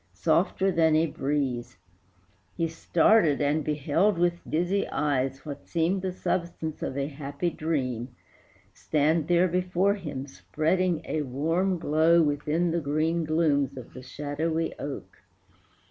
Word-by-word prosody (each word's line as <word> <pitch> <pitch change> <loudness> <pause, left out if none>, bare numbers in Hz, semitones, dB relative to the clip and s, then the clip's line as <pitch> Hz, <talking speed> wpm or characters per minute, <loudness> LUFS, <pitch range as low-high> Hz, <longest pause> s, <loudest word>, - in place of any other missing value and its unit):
softer 185 - +2
than 160 -3 +3
a 160 +1 +4
breeze. 135 -5 -2 0.8
He 165 - +1
started 165 0 +3
and 150 +2 +1
beheld 155 +7 +1
with 175 0 +1
dizzy 175 +5 0
eyes 135 -2 -1
What 145 -2 -8
seemed 175 +3 0
the 190 0 -2
substance 170 -3 -3
of 130 - -3
a 140 - 0
happy 145 +3 -3
dream 130 -8 -2 0.7
Stand 155 +1 +1
there 175 +1 +4
before 180 +2 +1
him, 150 -9 -5
spreading 165 +4 -1
a 155 - -1
warm 165 +8 0
glow 160 +1 +3
Within 150 +3 0
the 170 0 0
green 160 +3 0
glooms 150 -4 +1
of 125 - -10
the 130 - -9
shadowy 150 +5 -2
oak. 140 -1 -7
155 Hz, 130 wpm, -27 LUFS, 145-170 Hz, 0.8 s, a